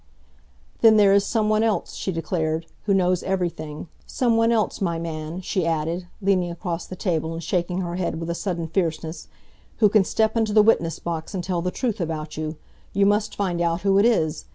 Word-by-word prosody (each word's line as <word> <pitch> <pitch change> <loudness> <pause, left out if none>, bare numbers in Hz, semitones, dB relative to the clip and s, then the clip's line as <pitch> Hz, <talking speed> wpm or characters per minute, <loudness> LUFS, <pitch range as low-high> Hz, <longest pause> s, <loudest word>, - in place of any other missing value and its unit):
"Then 220 -1 +6
there 200 -2 +6
is 200 0 +4
some 220 -3 +1
one 215 0 +3
else," 220 -2 0
she 190 - -3
declared, 160 -1 -2 0.2
"who 200 - +2
knows 180 -1 +2
everything 170 -5 -3 0.2
some 240 -3 +1
one 230 +1 +3
else, 215 -4 0
my 170 -3 0
man," 165 +1 -5
she 185 0 -1
added, 165 +2 -1 0.2
leaning 185 -3 +2
across 170 0 -4
the 185 - -7
table 165 -4 -1
and 165 +1 -6
shaking 180 +2 -1
her 175 -1 -3
head 175 -3 -2
with 165 0 -3
a - - 0
sudden 170 -2 -3
fierceness, 165 -1 -2 0.5
"who 215 -3 +5
can 210 -1 +4
step 220 +3 +1
into 220 -2 +1
the 215 -1 +7
witness 170 -7 +2
box 170 +2 -5
and 180 - -2
tell 175 -1 -1
the 180 - -1
truth 225 0 -2
about 155 -2 -4
you. 155 0 -4 0.4
You 200 0 +3
must 205 +1 +1
find 180 -4 -1
out 170 0 0
who 195 +1 +3
it 205 - +4
is. 160 -9 0
180 Hz, 205 wpm, -23 LUFS, 165-200 Hz, 0.5 s, the